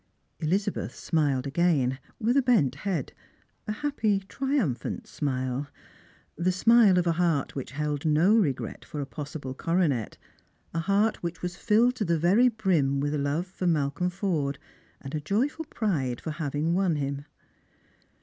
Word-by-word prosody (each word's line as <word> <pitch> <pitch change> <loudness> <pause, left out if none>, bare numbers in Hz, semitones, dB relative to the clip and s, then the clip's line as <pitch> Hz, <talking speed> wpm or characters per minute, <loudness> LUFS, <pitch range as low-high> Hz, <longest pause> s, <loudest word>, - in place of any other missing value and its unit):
Elizabeth 190 +5 -1
smiled 145 -5 0
again, 140 -4 +1 0.2
with 245 +4 +2
bent 215 - +3
head, 170 -2 -3 0.5
a - - -1
happy 215 -5 0
triumphant 265 - -1
smile. 130 -1 -2 0.7
The 175 +2 +1
smile 210 0 +5
of 180 - +2
a 170 - +3
heart 165 -4 +1
which 135 -1 -5
held 150 0 -2
no 160 +6 +4
regret 150 - 0
for 155 - -7
a 140 - -2
possible 145 -2 -6
coronet; 155 - 0 0.6
a 165 - -1
heart 200 +5 +1
which 170 0 -5
was 180 0 -3
filled 230 +5 +3
to 215 - -1
the 170 -1 +2
very 190 +10 +4
brim 175 - +1
with 145 +1 -1
love 145 +4 0
for 185 -1 -4
Malcolm 150 +1 +1
Forde, 170 -7 -1 0.4
and 145 +2 -5
joyful 270 - 0
pride 150 - -1
for 160 - -5
having 150 +1 -1
won 185 -3 +2
him. 140 0 -3
165 Hz, 145 wpm, -27 LUFS, 145-200 Hz, 0.7 s, smile